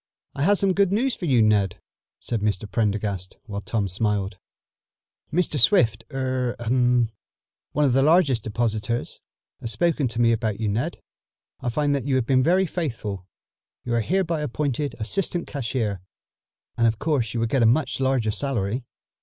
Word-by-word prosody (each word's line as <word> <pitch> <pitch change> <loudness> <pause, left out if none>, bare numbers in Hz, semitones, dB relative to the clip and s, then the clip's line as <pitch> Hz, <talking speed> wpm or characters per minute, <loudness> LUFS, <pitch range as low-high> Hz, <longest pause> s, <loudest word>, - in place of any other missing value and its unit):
"I - - -5
have 200 +7 +4
some 195 -1 +2
good 195 -1 +2
news 245 +6 +1
for 180 - -5
you, 125 -7 +4
Ned," 100 -4 +2 0.4
said 115 -3 -3
Mr. 105 -1 0
Prendergast, 100 -2 -2
while 100 -5 -5
Tom 105 -2 -1
smiled. 100 0 -1 0.9
"Mr. 155 -2 0
Swift 115 -2 +4
er 130 -2 -1
ahem 120 0 +2 0.6
one 150 +1 +2
of 130 -3 +2
our 135 - +4
largest 145 - +4
depositors, 115 0 -2 0.4
has 115 - -3
spoken 165 -4 +1
to 115 0 -4
me 115 -1 +4
about 110 -2 -1
you, 110 -2 0
Ned. 120 +12 -2 0.6
I 125 - -2
find 145 +4 +1
that 140 -3 -1
you 135 - +2
have 130 -3 +1
been 130 +1 +3
very 180 +7 +3
faithful. 110 - -4 0.6
You 120 - -2
are 120 - +2
hereby 170 - 0
appointed 145 0 -2
assistant 175 - -1
cashier, 115 - -2 0.7
and 115 -1 +3
of 110 -1 +1
course 125 -6 -1
you - - 0
will 115 - +1
get 130 +3 +1
a 115 - +5
much 135 +6 +1
larger 130 -5 +1
salary." 120 -2 -1
120 Hz, 170 wpm, -24 LUFS, 110-145 Hz, 0.9 s, a